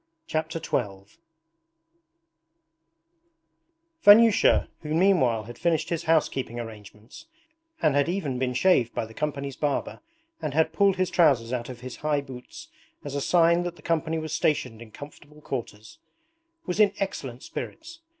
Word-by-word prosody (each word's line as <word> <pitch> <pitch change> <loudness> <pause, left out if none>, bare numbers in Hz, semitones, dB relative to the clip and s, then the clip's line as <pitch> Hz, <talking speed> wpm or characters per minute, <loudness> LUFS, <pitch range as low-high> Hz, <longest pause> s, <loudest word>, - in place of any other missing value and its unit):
Chapter 160 - -3
XII 100 -7 -4 2.9
Vanyusha, 220 +1 +6
who 155 0 -3
meanwhile 160 - +3
had 120 +2 -11
finished 170 -3 0
his 170 0 -3
housekeeping 135 -7 0
arrangements 110 - -11 0.6
and 155 -3 +4
had 145 +3 +2
even 155 -9 -2
been 125 -1 -1
shaved 125 -7 +3
by - - -1
the 110 - -13
company's 140 -1 -3
barber 145 -2 -2 0.4
and 150 -2 -3
had 160 0 +2
pulled 195 +2 +3
his 185 -1 -1
trousers 130 -8 +3
out 120 -1 -3
of 125 -2 -9
his 130 0 -8
high 150 -1 0
boots 140 - -11 0.4
as 145 - -5
a 140 - -2
sign 170 +2 +3
that 175 -1 -4
the - - -18
company 165 -1 -1
was 155 0 -5
stationed 125 -7 0
in 115 - -11
comfortable 145 +4 -13
quarters, 115 -7 -7 0.7
was 180 +2 -3
in 205 -2 +5
excellent 135 -10 -5
spirits. 330 +1 -8
150 Hz, 145 wpm, -26 LUFS, 125-170 Hz, 2.9 s, Vanyusha